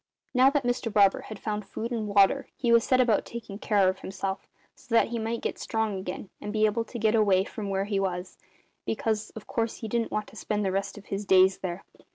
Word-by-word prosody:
"Now 255 +1 +6
that 285 -1 0
Mr 245 -2 -1
Barber 200 -2 +4
had 215 - -6
found 210 0 -3
food 220 +4 -5
and 225 -3 -2
water 200 +7 +4
he 235 -2 +5
set 255 +3 +2
about 235 -5 +3
taking 220 -4 -8
care 205 -4 +3
of 185 0 0
himself, 190 0 -4 0.3
so 230 - -5
that 230 - +4
he 235 0 -2
might 225 +1 -2
get - - -3
strong 220 -3 -1
again 185 +1 -6
and 210 - -4
be 215 0 +3
able 220 +2 +1
to 240 - -7
get 220 -1 +2
away 200 -4 +4
from 205 0 -6
where 195 0 0
he 200 -1 -1
was 185 -1 -3 0.4
because, 220 -1 -1
of 220 - -8
course, 230 -1 -2
he 225 - -4
didn't 230 +1 -1
want 210 0 -1
to - - -17
spend 210 -1 -2
the 190 - +1
rest 195 +2 -2
of 205 - -11
his 200 +1 -3
days 190 -1 +5
there. 185 0 -5
210 Hz, 230 wpm, -27 LUFS, 195-230 Hz, 0.4 s, Now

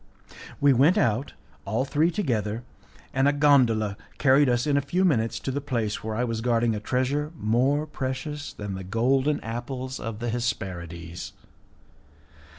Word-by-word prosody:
We 140 -1 +5
went 145 - +4
out 125 - +1 0.3
all 110 +7 -1
three 150 +4 +2
together, 120 - -1 0.5
and 135 +1 +3
a - - +5
gondola 125 -8 +3 0.2
carried 140 0 +5
us 120 0 +1
in 145 -2 +2
a 140 - +3
few 175 +7 +1
minutes 115 -10 +1
to 135 - -3
the 145 +2 -2
place 115 -7 -2
where 110 0 -3
I 120 - 0
was 115 -2 -2
guarding 115 -1 +2
a 105 - -2
treasure 130 +7 -1
more 130 +7 +2
precious 145 +1 -4
than 105 -2 -6
the 95 0 -5
golden 130 +9 +1
apples 125 +3 -5
of 115 -1 -5
the 120 +1 -3
Hesperides. 90 -8 -4
125 Hz, 155 wpm, -26 LUFS, 110-140 Hz, 0.5 s, We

